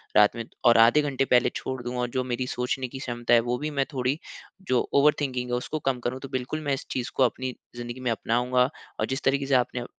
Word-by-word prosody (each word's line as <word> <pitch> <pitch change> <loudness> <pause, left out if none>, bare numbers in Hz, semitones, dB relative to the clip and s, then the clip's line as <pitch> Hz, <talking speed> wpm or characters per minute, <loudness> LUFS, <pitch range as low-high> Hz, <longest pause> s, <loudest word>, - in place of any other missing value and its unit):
रात 105 +1 +6
में 115 - -4 0.2
और 120 - +7
आधे 115 +6 +6
घंटे 135 -2 0
पहले 125 -1 +4
छोड़ 130 -1 -4
दूँ 120 +1 -4
और 125 -1 -1
जो 130 +1 -1
मेरी 125 0 -2
सोचने 125 +1 -2
की 135 +2 -8
क्षमता 120 -1 -1
है 120 - +8
वो 125 - +1
भी 150 +3 -3
मैं 135 - +3
थोड़ी 130 +3 0 0.5
जो 125 -1 +3
ओवर 145 +2 +6
थिंकिंग 125 -3 -2
है - - +2
उसको 150 +5 -4
कम 125 -2 -1
करूँ 125 +2 -3
तो 135 - -8
बिल्कुल 130 +4 -3
मैं 140 - +1
इस 135 - -4
चीज़ 125 -2 -3
को 130 - +4
अपनी 130 +1 -1 0.2
ज़िंदगी 120 +1 -6
में 125 -2 -1
अपनाऊँगा 125 +3 +1 0.3
और 110 - +2
जिस 140 - -5
तरीके 140 +1 +2
से 135 0 +2
आपने 125 -1 0
125 Hz, 245 wpm, -26 LUFS, 120-135 Hz, 0.5 s, है